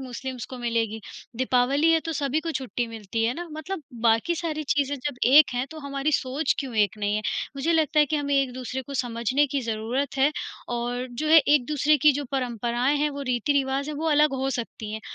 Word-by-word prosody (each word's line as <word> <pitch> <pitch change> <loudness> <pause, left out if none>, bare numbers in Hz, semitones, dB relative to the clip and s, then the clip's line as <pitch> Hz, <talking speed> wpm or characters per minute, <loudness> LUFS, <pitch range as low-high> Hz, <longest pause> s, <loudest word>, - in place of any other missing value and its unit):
Muslims 255 -1 -6
को 255 - -7
मिलेगी, 230 -2 -1 0.4
दीपावली 260 +5 +2
है, 325 - +3
तो - - -24
तो 325 - -2
सभी 290 +1 0
को 330 - -4
छुट्टी 250 -2 -3
मिलती 225 0 -4
है 235 - +1
ना 345 +1 -6
मतलब 315 +2 -5 0.2
बाकी 230 +9 +3
सारी 315 -2 -3
चीज़ें 285 -1 0
जब 275 0 -4
एक 285 +4 +7
हैं, 250 +2 -1
तो 320 - -9
हमारी 280 +1 -2
सोच 270 +3 0
क्यों 265 -5 -4
एक 210 -1 +2
नहीं 205 0 0
है? 215 - -2 0.3
मुझे 320 +5 +1
लगता 315 -1 +2
है 295 - +4
कि 305 - -1
हमें 285 -1 -1
एक 270 -2 +2
दूसरे 255 +1 -5
को 280 +1 -9
समझने 245 +3 +1
की 280 0 -2
ज़रूरत 235 +5 -2
है 275 +3 +4 0.5
और 245 +1 -3
जो 305 +6 -3
है 325 - +9
एक 290 -3 +3
दूसरे 300 0 +3
की 295 +2 +6
जो 285 +1 -3
परंपराएँ 245 +1 0
हैं, 295 +1 +1
वो 280 0 -6
रीति-रिवाज़ 270 +3 0
हैं 295 - -5
वो 320 +1 -1
अलग 300 -1 +4
हो 270 +1 -1
सकती 230 -3 -5
हैं, 220 - -4
270 Hz, 220 wpm, -25 LUFS, 240-295 Hz, 0.5 s, है